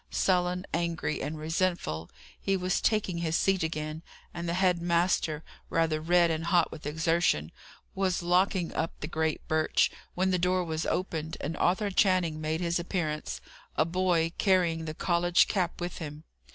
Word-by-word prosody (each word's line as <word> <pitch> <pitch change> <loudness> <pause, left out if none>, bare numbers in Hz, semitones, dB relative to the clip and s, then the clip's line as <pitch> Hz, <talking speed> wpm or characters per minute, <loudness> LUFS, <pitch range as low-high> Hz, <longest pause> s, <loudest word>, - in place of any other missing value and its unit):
Sullen, 180 0 +1
angry, 165 -2 -1
and 150 +3 -3
resentful, 155 - -1 0.3
he 195 0 +1
was 180 0 0
taking 205 -6 +1
his 165 -1 -1
seat 195 0 +2
again, 155 -1 -3 0.3
and 170 0 -4
the 170 - 0
head 180 -2 +2
master, 170 -2 +1 0.3
rather 160 -2 +1
red 170 +1 +4
and 160 +1 -2
hot 175 -1 +3
with 150 -2 -7
exertion, 160 - +1 0.4
was 190 -2 0
locking 180 0 +2
up 165 - -3
the 150 - -3
great 160 -1 -2
birch, 155 0 +2 0.2
when 185 +1 +1
the 180 - +2
door 180 +1 +2
was 160 -1 -3
opened, 160 -3 -2
and 155 +3 -3
Arthur 200 +3 +1
Channing 185 -5 +2
made 155 +2 -1
his 170 0 0
appearance; 170 -4 -3 0.4
a 155 - +4
boy, 170 -1 +1
carrying 175 -5 +2
the 155 -1 -5
college 175 +1 +3
cap, 180 -4 -1
with 175 0 -4
him. 150 -2 -7
170 Hz, 165 wpm, -29 LUFS, 160-180 Hz, 0.4 s, red